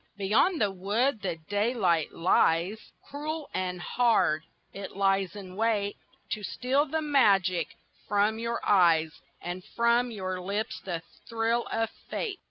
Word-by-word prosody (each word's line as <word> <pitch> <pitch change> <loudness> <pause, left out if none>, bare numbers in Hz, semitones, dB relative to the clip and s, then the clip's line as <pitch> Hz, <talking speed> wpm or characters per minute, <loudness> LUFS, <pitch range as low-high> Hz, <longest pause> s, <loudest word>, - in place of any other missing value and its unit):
Beyond 215 - +2
the 205 -2 +2
wood 210 +6 0
the 185 -4 -2
daylight 205 -6 +1
lies; 175 +3 +1 0.2
Cruel 300 +2 -5
and 180 -1 -2
hard, 220 -6 +2 0.3
it 195 -1 -8
lies 195 -1 +1
in 185 -3 -9
wait 210 -2 0 0.4
To 210 - -2
steal 260 +8 0
the 315 +2 -1
magic 195 - +3 0.4
from 210 +2 +2
your 235 0 -2
eyes 165 -5 +4 0.2
And 175 +1 -5
from 235 +3 +2
your 185 -4 -4
lips 205 +4 -3
the 170 -3 -4 0.3
thrill 230 +1 0
of 225 0 0 0.2
fate. 400 -5 -3
205 Hz, 135 wpm, -28 LUFS, 185-235 Hz, 0.4 s, eyes